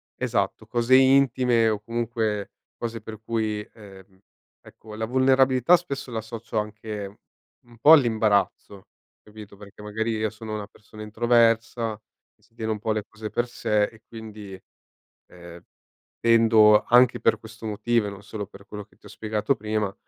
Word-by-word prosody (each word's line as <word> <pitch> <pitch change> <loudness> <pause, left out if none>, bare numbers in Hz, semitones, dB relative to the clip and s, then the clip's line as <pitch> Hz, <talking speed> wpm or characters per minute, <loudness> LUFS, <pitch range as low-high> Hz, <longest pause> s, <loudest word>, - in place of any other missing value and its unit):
esatto, - - -2
cose 120 +2 +2
intime 130 -3 +4
o, 105 -2 -1
comunque, 115 -3 -3 0.3
cose 115 -2 -5
per 110 -1 -9
cui 110 -2 -2
ehm, 95 -2 -16 0.4
ecco, 110 -1 -13
la 110 0 -3
vulnerabilità 130 +4 +4
spesso 140 -7 -7
la 110 - -3
associo 115 0 -7
anche 105 -1 -6 0.5
un 120 -1 -19
po' 150 +7 +6
all'imbarazzo, 110 -6 +1 0.4
capito, 105 -1 -13
perché 105 0 -14
magari 110 +2 -3
io 110 0 -1
sono 110 0 -8
una 105 -1 -6
persona 110 +1 -15
introversa, 115 0 +1 0.4
si 110 +2 -32
tiene 110 -1 -3
un 105 - -3
po' 110 +1 -2
le 110 -1 -1
cose 110 0 -8
per 120 +1 -1
sé, 105 -3 0
e 110 0 -13
quindi, 105 -4 -10 0.7
ehm, 85 -1 -13 0.6
tendo 115 -2 +5
anche 125 0 +4
per 115 - +2
questo 115 0 -12
motivo, 110 +1 0
e - - -3
non 100 0 -11
solo 105 -1 -6
per 100 -1 -16
quello 105 -1 -8
che - - -29
ti - - -24
ho - - -12
spiegato 110 +4 -2
prima, 105 -2 -2
110 Hz, 160 wpm, -24 LUFS, 105-115 Hz, 0.7 s, po